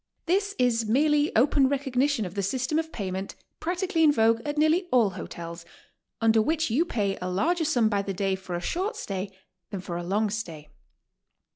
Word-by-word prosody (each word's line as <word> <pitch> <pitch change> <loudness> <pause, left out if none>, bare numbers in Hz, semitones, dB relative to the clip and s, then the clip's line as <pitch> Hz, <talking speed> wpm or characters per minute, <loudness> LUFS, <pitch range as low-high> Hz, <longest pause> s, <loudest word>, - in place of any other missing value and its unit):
This 400 +3 +1
is 230 -3 +1
merely 295 +4 +3
open 270 +3 +4
recognition 270 -3 0
of 180 - -6
the 200 - -2
system 260 +9 0
of 320 0 -4
payment 190 -4 -4 0.2
practically 355 0 0
in 305 - +7
vogue 225 -3 +3
at 295 0 -4
nearly 315 +4 +3
all 230 -6 +4
hotels, 170 -1 -7 0.6
under 225 -1 +4
which 315 +3 0
you 300 +9 +2
pay 205 - -1
a 180 - -2
larger 320 - +1
sum 245 -8 +3
by 205 -2 +1
the 200 - -4
day 195 0 -1
for 190 -2 -5
a 175 - -3
short 380 - -2
stay 195 - -4 0.4
than 195 - -5
for 175 -1 -5
a 175 - -4
long 205 +4 0
stay. 165 -9 -6
230 Hz, 185 wpm, -26 LUFS, 195-305 Hz, 0.6 s, in